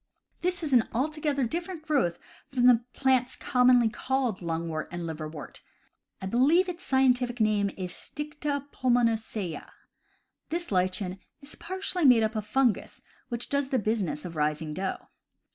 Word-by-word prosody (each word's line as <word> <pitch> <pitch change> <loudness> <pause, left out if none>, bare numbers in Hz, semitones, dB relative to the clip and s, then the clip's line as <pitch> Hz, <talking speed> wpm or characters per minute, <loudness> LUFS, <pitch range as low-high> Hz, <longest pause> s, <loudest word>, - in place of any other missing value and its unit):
This 360 -1 -1
is 295 -3 -2
an 240 -3 +4
altogether 290 +2 0
different 335 +6 -3
growth 270 - +1 0.3
from 250 -2 +1
the 245 -2 +6
plants 260 -2 +2
com 250 0 +2
monly 245 -3 +5
called 260 -6 -1
lungwort 165 -2 -3
and 175 0 -5
liverwort 155 -2 -6 0.3
— - - -45
I - - -2
believe 275 - +4
its 355 -1 -6
scientific 250 -2 +2
name 210 -2 +2
is 185 -2 -4
Stida 295 -1 -4
pulmonacea. 225 -7 0 0.8
This 345 -2 -3
lichen 185 0 0 0.2
is 280 +1 -10
partly 370 0 -3
made 250 -5 +7
up 220 +1 -1
of 215 -1 -3
fungus, 245 0 0 0.3
which 240 -1 -3
does 280 -1 0
the 265 - +1
business 210 -8 -1
of 170 -2 -7
raising 150 0 -1
dough. 190 +3 -4
245 Hz, 150 wpm, -28 LUFS, 190-280 Hz, 0.8 s, made